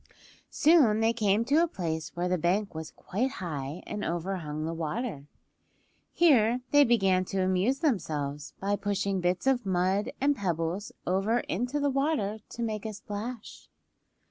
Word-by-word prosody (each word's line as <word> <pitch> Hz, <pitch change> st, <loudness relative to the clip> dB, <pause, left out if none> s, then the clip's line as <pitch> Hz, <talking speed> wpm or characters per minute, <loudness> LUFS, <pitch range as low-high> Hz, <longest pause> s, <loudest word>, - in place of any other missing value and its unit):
Soon 285 Hz, -10 st, +4 dB
they 225 Hz, +1 st, +3 dB
came 215 Hz, -1 st, +2 dB
to 290 Hz, +6 st, +4 dB
a 345 Hz, -, +3 dB
place 160 Hz, -, -3 dB
where 175 Hz, +1 st, -1 dB
the 180 Hz, -, +1 dB
bank 195 Hz, +5 st, 0 dB
was 160 Hz, 0 st, -6 dB
quite 250 Hz, +8 st, -3 dB
high 150 Hz, -, -5 dB
and 210 Hz, 0 st, -4 dB
overhung 165 Hz, -3 st, -3 dB
the 165 Hz, -, -2 dB
water. 165 Hz, -, -4 dB, 0.8 s
Here 250 Hz, -8 st, +4 dB
they 290 Hz, 0 st, +7 dB
began 195 Hz, -7 st, +3 dB
to 190 Hz, 0 st, -1 dB
amuse 190 Hz, -, +1 dB
themselves 150 Hz, -, -2 dB
by 200 Hz, +1 st, 0 dB
pushing 200 Hz, -2 st, -1 dB
bits 180 Hz, +4 st, 0 dB
of 265 Hz, -2 st, +2 dB
mud 190 Hz, +1 st, +1 dB
and 285 Hz, +1 st, +2 dB
pebbles 175 Hz, -, -2 dB
over 195 Hz, +6 st, +1 dB
into 245 Hz, +9 st, -2 dB
the 285 Hz, -1 st, +1 dB
water 270 Hz, -7 st, 0 dB
to 235 Hz, -, -5 dB
make 215 Hz, -2 st, -3 dB
a 215 Hz, -, -5 dB
splash. 210 Hz, +3 st, -7 dB
200 Hz, 155 wpm, -28 LUFS, 175-240 Hz, 0.8 s, they